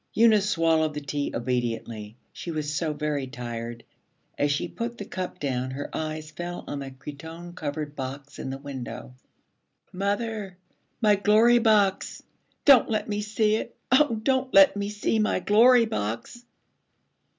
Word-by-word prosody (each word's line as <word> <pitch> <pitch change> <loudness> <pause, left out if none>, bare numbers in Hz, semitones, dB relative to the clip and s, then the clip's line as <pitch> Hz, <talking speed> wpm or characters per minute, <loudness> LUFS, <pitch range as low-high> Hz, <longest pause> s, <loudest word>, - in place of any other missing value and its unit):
Eunice 215 -3 +5
swallowed 160 -4 +2
the - - -2
tea 145 0 -3
obediently, 115 -3 -3 0.2
she - - -7
was 155 -2 -3
so 155 +1 -1
very 150 -2 -2
tired. 120 -2 -6 0.5
As 145 0 +1
she 145 - -1
put 235 +1 -5
the 205 - -6
cup 185 -1 -5
down 130 -2 -2
her 135 +2 -6
eyes 155 0 -4
fell 175 +1 -6
on 145 - -5
the 135 -1 -6
cretonne 160 +6 -9
covered 150 -2 -5
box 135 +1 -7
in - - -4
the 135 - -4
window. 135 -2 -7 0.8
'Mother, 200 0 -2 0.4
my 210 -2 +5
Glory 220 +4 +5
Box! 210 -4 +2 0.4
Don't 275 -5 +7
let 215 -1 -1
me 210 -1 -2
see 215 +1 +1
it! 230 - -7
Oh, 265 -2 +4
don't 260 0 +1
let 290 -5 +8
me 200 0 -2
see 210 +1 0
my 215 -3 +1
Glory 230 +6 +6
Box!' 115 - -4
165 Hz, 150 wpm, -26 LUFS, 140-215 Hz, 0.8 s, let